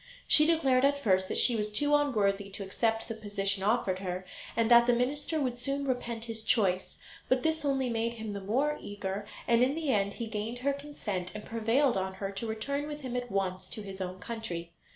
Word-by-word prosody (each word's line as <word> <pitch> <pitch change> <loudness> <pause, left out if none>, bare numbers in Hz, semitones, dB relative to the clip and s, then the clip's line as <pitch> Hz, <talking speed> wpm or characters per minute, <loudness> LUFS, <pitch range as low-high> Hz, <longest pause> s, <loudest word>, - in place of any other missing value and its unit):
She 305 0 +7
declared 270 -6 +3
at 280 +1 +4
first 190 -8 +2
that - - -2
she 245 - +4
was 210 -1 -1
too 290 +7 +3
unworthy 205 -9 +1
to 200 +1 -6
accept 225 +3 0
the 225 - -3
position 200 -2 -2
offered 195 -3 +1
her, 185 -1 -4 0.3
and 230 0 +2
that 235 0 +8
the 245 - +5
minister 285 +6 0
would 250 -4 -1
soon 275 +2 -1
repent 235 -3 -2
his 225 -1 -4
choice; 195 -5 +1 0.3
but 260 -1 +3
this 320 -1 +1
only 270 -2 +1
made 230 0 -1
him 220 -2 -5
the 200 - -5
more 270 +10 0
eager, 205 0 -4 0.2
and 235 0 +4
in 260 +3 +3
the 315 -4 0
end 200 -2 +1
he 235 - -4
gained 220 +2 -4
her 280 - +3
consent, 215 -11 -5
and 210 - -6
prevailed 230 +3 +2
on 190 0 -2
her 195 0 -4
to 200 +4 -5
return 280 +7 -2
with 295 0 -6
him 255 -2 -5
at 245 0 -2
once 190 -1 -1
to 215 - -6
his 195 -1 -7
own 185 0 -4
country. 180 -6 -5
225 Hz, 215 wpm, -30 LUFS, 200-265 Hz, 0.3 s, that